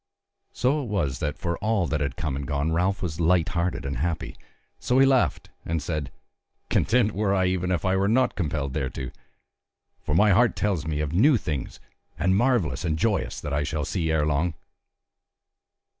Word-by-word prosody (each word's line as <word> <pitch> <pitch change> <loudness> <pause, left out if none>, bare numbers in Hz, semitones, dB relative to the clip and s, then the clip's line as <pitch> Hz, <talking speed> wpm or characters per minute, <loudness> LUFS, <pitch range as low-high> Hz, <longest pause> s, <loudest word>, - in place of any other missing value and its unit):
So 140 +4 +1
it 130 - -5
was 85 - -1
that 75 -1 -2
for 85 -3 -2
all 110 -3 +1
that 75 -2 -1
had 70 -3 -2
come 75 -4 -3
and 70 0 -5
gone 75 +2 -1
Ralph 90 +4 0
was 80 -3 -4
light 85 0 +3
hearted 85 -4 -2
and 70 -1 -3
happy; 80 +4 -2 0.4
so 125 - +1
he 135 - +7
laughed 135 -2 +1
and 80 0 -1
said: 75 -2 -4 0.6
"Content 115 -2 +3
were 100 -1 0
I, 95 -1 +2
even 90 0 0
if 90 -1 -1
I 95 0 +2
were 95 +1 +2
not 125 +4 +2
compelled 75 -6 -2
thereto. 65 -3 -3 0.9
For 75 - -2
my 105 +4 +5
heart 115 +5 +4
tells 95 -8 -1
me 75 -1 -1
of 75 0 -3
new 125 - +5
things, 75 - -4 0.4
and 95 +4 +2
marvellous 100 - +1
and 80 -3 0
joyous 100 +2 0
that 75 - -4
I 70 - +1
shall 75 0 -2
see 85 -4 -2
ere 80 -2 +2
long." 75 +3 0
85 Hz, 190 wpm, -25 LUFS, 75-100 Hz, 0.9 s, he